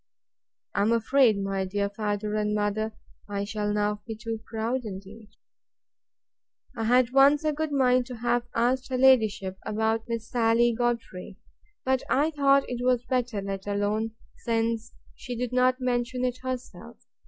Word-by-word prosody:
I 200 Hz, -, +1 dB
am 210 Hz, +3 st, +3 dB
afraid, 235 Hz, -1 st, +4 dB
my 195 Hz, -1 st, -1 dB
dear 200 Hz, +2 st, -1 dB
father 210 Hz, 0 st, -3 dB
and 210 Hz, 0 st, 0 dB
mother, 210 Hz, +1 st, -1 dB, 0.4 s
I 200 Hz, 0 st, -2 dB
shall 210 Hz, 0 st, -2 dB
now 210 Hz, 0 st, 0 dB
be 225 Hz, -, -4 dB
too 225 Hz, +1 st, -5 dB
proud 230 Hz, +3 st, -2 dB
indeed. 205 Hz, +1 st, -9 dB, 1.5 s
I 225 Hz, -2 st, -2 dB
had 250 Hz, +1 st, +4 dB
once 275 Hz, +3 st, +5 dB
a 305 Hz, -1 st, +1 dB
good 310 Hz, +1 st, -2 dB
mind 255 Hz, -3 st, +3 dB
to 250 Hz, -, -7 dB
have 240 Hz, +1 st, 0 dB
asked 255 Hz, +3 st, +1 dB
her 255 Hz, -, -1 dB
ladyship 215 Hz, -7 st, +3 dB
about 220 Hz, +1 st, -1 dB
Miss 230 Hz, -1 st, -4 dB
Sally 235 Hz, 0 st, +3 dB
Godfrey; 230 Hz, -6 st, -3 dB, 0.5 s
but 260 Hz, 0 st, +2 dB
I 295 Hz, +4 st, +2 dB
thought 275 Hz, -2 st, +3 dB
it 245 Hz, 0 st, -4 dB
was 250 Hz, -1 st, +2 dB
better 245 Hz, -6 st, -1 dB
let 195 Hz, 0 st, -5 dB
alone, 210 Hz, +2 st, -1 dB, 0.2 s
since 230 Hz, 0 st, -1 dB, 0.2 s
she 250 Hz, -2 st, -7 dB
did 245 Hz, +1 st, -3 dB
not 255 Hz, +1 st, +3 dB
mention 250 Hz, 0 st, -1 dB
It 250 Hz, 0 st, -2 dB
herself. 255 Hz, -1 st, -6 dB
230 Hz, 155 wpm, -27 LUFS, 210-250 Hz, 1.5 s, once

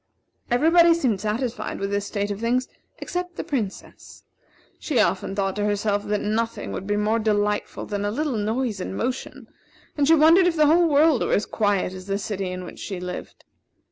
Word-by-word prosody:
Everybody 330 Hz, +6 st, +5 dB
seemed 240 Hz, -, 0 dB
satisfied 225 Hz, +3 st, -3 dB
with 195 Hz, 0 st, -3 dB
this 200 Hz, 0 st, -1 dB
state 205 Hz, -1 st, -2 dB
of 200 Hz, -, -4 dB
things 245 Hz, +3 st, 0 dB, 0.3 s
except 360 Hz, -1 st, -4 dB
the -, -, -4 dB
Princess. 225 Hz, -9 st, -5 dB, 0.6 s
She 285 Hz, -6 st, 0 dB
often 190 Hz, +1 st, +1 dB
thought 195 Hz, -1 st, -1 dB
to 205 Hz, -, 0 dB
herself 205 Hz, 0 st, 0 dB
that 210 Hz, 0 st, 0 dB
nothing 225 Hz, +2 st, -2 dB
would 195 Hz, -, -5 dB
be 205 Hz, 0 st, 0 dB
more 215 Hz, +2 st, +1 dB
delightful 210 Hz, -1 st, -1 dB
than 205 Hz, -1 st, -3 dB
a 205 Hz, -, 0 dB
little 285 Hz, +4 st, -2 dB
noise 220 Hz, 0 st, -1 dB
and 190 Hz, -, -5 dB
motion, 250 Hz, +2 st, -4 dB, 0.5 s
and 285 Hz, -2 st, +1 dB
she 325 Hz, -, +7 dB
wondered 330 Hz, +4 st, +6 dB
if 345 Hz, -, +1 dB
the 305 Hz, -1 st, +4 dB
whole 335 Hz, +3 st, +5 dB
world 295 Hz, -2 st, +4 dB
were -, -, 0 dB
as 205 Hz, -, +2 dB
quiet 205 Hz, -4 st, 0 dB
as 185 Hz, 0 st, -9 dB
the 195 Hz, 0 st, 0 dB
city 195 Hz, -2 st, -3 dB
in 185 Hz, 0 st, -5 dB
which -, -, -10 dB
she 190 Hz, -3 st, -5 dB
lived. 180 Hz, 0 st, -7 dB
215 Hz, 195 wpm, -24 LUFS, 200-280 Hz, 0.6 s, she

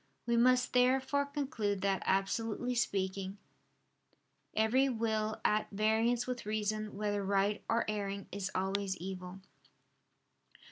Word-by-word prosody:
We 235 Hz, 0 st, +1 dB
must 250 Hz, +1 st, +4 dB
therefore 265 Hz, +3 st, +3 dB
conclude 235 Hz, -9 st, -2 dB
that, 195 Hz, -1 st, +1 dB
absolutely 225 Hz, +5 st, 0 dB
speaking, 195 Hz, -4 st, -1 dB, 1.2 s
every 245 Hz, +5 st, +3 dB
will 220 Hz, -2 st, -1 dB
at 215 Hz, 0 st, +2 dB
variance 220 Hz, +3 st, +2 dB
with 250 Hz, -1 st, -4 dB
reason, 215 Hz, 0 st, -2 dB
whether 205 Hz, -1 st, -1 dB
right 200 Hz, +1 st, +1 dB
or 230 Hz, +1 st, +2 dB
erring, 200 Hz, -2 st, -3 dB
is 195 Hz, -1 st, -3 dB
always 190 Hz, 0 st, -1 dB
evil. 185 Hz, +1 st, -7 dB
215 Hz, 110 wpm, -33 LUFS, 195-235 Hz, 1.2 s, must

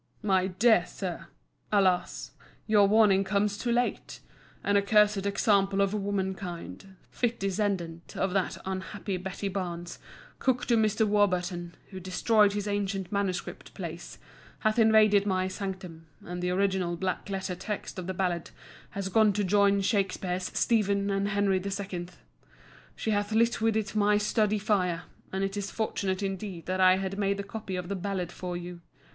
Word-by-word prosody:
MY 190 Hz, -2 st, +2 dB
DEAR 195 Hz, +1 st, +4 dB
SIR,—Alas, 185 Hz, +1 st, -2 dB, 0.3 s
your 210 Hz, -2 st, +5 dB
warning 205 Hz, -2 st, +5 dB
comes 200 Hz, +1 st, 0 dB
too 235 Hz, +3 st, -2 dB
late. 245 Hz, +1 st, -1 dB, 0.4 s
An 205 Hz, -, +1 dB
accursed 205 Hz, 0 st, +3 dB
example 200 Hz, -1 st, +2 dB
of 200 Hz, 0 st, +2 dB
womankind, 190 Hz, -2 st, -4 dB, 0.2 s
fit 240 Hz, -1 st, -1 dB
descendant 190 Hz, -4 st, -2 dB
of 190 Hz, -1 st, 0 dB
that 195 Hz, -2 st, 0 dB
unhappy 190 Hz, +1 st, -4 dB
Betty 190 Hz, +2 st, -4 dB
Barnes, 175 Hz, -3 st, -4 dB, 0.4 s
cook 255 Hz, -2 st, +1 dB
to 235 Hz, -, +3 dB
Mr. 220 Hz, 0 st, +2 dB
Warburton, 180 Hz, -4 st, 0 dB, 0.2 s
who 190 Hz, -, -6 dB
destroyed 200 Hz, +3 st, +3 dB
his 205 Hz, 0 st, -3 dB
ancient 200 Hz, -2 st, -2 dB
manuscript 200 Hz, -3 st, -3 dB
plays, -, -, -7 dB, 0.4 s
hath 215 Hz, +1 st, +2 dB
invaded 215 Hz, -2 st, +5 dB
my 185 Hz, -1 st, +1 dB
sanctum, 185 Hz, -4 st, -6 dB, 0.2 s
and 175 Hz, 0 st, -5 dB
the 180 Hz, -, 0 dB
original 185 Hz, -2 st, 0 dB
black 190 Hz, +2 st, -3 dB
letter 190 Hz, -1 st, -3 dB
text 190 Hz, +1 st, -5 dB
of 180 Hz, -, -6 dB
the 190 Hz, -, -2 dB
ballad 175 Hz, -3 st, -1 dB, 0.4 s
has 200 Hz, -1 st, -4 dB
gone 215 Hz, +2 st, +4 dB
to 205 Hz, +1 st, 0 dB
join 200 Hz, +1 st, +3 dB
Shakspeare's 190 Hz, -3 st, 0 dB
"Stephen" 200 Hz, -3 st, +2 dB
and 195 Hz, 0 st, 0 dB
"Henry 200 Hz, -2 st, +1 dB
II." 195 Hz, -3 st, -4 dB, 0.9 s
She 220 Hz, -, -2 dB
hath 205 Hz, +1 st, 0 dB
lit 230 Hz, +1 st, +2 dB
with 225 Hz, -1 st, +2 dB
it 215 Hz, 0 st, -3 dB
my 210 Hz, 0 st, +4 dB
study 210 Hz, 0 st, +1 dB
fire, 185 Hz, -5 st, 0 dB, 0.3 s
and 190 Hz, +1 st, -1 dB
it 195 Hz, +1 st, -2 dB
is 200 Hz, -1 st, -3 dB
fortunate 200 Hz, -3 st, -2 dB
indeed 195 Hz, -3 st, -4 dB
that 185 Hz, 0 st, -1 dB
I 185 Hz, 0 st, +6 dB
had 195 Hz, +1 st, -3 dB
made 200 Hz, -1 st, +1 dB
the 200 Hz, -, -3 dB
copy 200 Hz, -2 st, -6 dB
of 180 Hz, -1 st, -4 dB
the 200 Hz, -, -2 dB
ballad 185 Hz, -2 st, -3 dB
for 180 Hz, -1 st, -5 dB
you. 175 Hz, 0 st, -8 dB
195 Hz, 155 wpm, -28 LUFS, 185-205 Hz, 0.9 s, I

